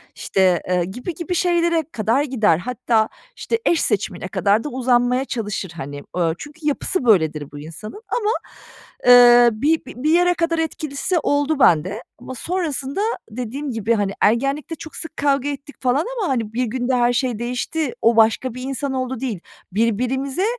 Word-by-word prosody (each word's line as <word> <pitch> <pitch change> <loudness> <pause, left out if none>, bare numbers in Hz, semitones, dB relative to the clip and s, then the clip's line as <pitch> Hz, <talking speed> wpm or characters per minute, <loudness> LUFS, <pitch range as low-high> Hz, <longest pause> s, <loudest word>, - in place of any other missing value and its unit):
işte, 185 -3 +2
eee, 180 -1 +1
gibi 245 - -6
gibi 340 +2 -3
şeylere 340 -2 +2
kadar 230 +6 +1
gider. 220 - +2
Hatta, 230 +1 0 0.3
işte, 460 - -2
eş 335 - +3
seçimine 195 -4 -1
kadar 205 +3 +1
da - - -4
uzanmaya 250 0 +1
çalışır, 210 -8 -4
hani. 145 -2 -7
Iıı, 165 -2 +2
çünkü 295 +2 -11
yapısı 295 +1 -1
böyledir 160 - +2
bu 145 - -9
insanın 165 - -9
ama, 425 -3 -1 0.8
eee, 245 -1 +8
bi 300 +9 +1
bir 260 +4 -3
yere 355 +1 +4
kadar 335 -1 0
etkilisi 315 +2 -1
oldu 290 0 0
bende 185 - +3 0.2
ama 260 - -8
sonrasında 305 - -3 0.3
dediğim 255 +5 -4
gibi, 225 0 0
hani, 205 -3 0
ergenlikte 275 +9 +1
çok 315 0 -10
sık 320 -1 -8
kavga 280 -1 +1
ettik 285 +1 -7
falan 260 +4 +1
ama, 410 -6 -1
hani, 230 -5 -1
1 250 +2 0
günde 245 +2 -1
her 245 0 +3
şey 245 -3 -1
değişti, 250 +4 -2
o 230 +1 +4
başka 225 +3 +3
bir 255 - -7
insan 270 +1 -3
oldu, 255 -1 -3
değil. 240 -7 -3 0.3
Birbirimize, 250 - 0
250 Hz, 165 wpm, -21 LUFS, 220-290 Hz, 0.8 s, eee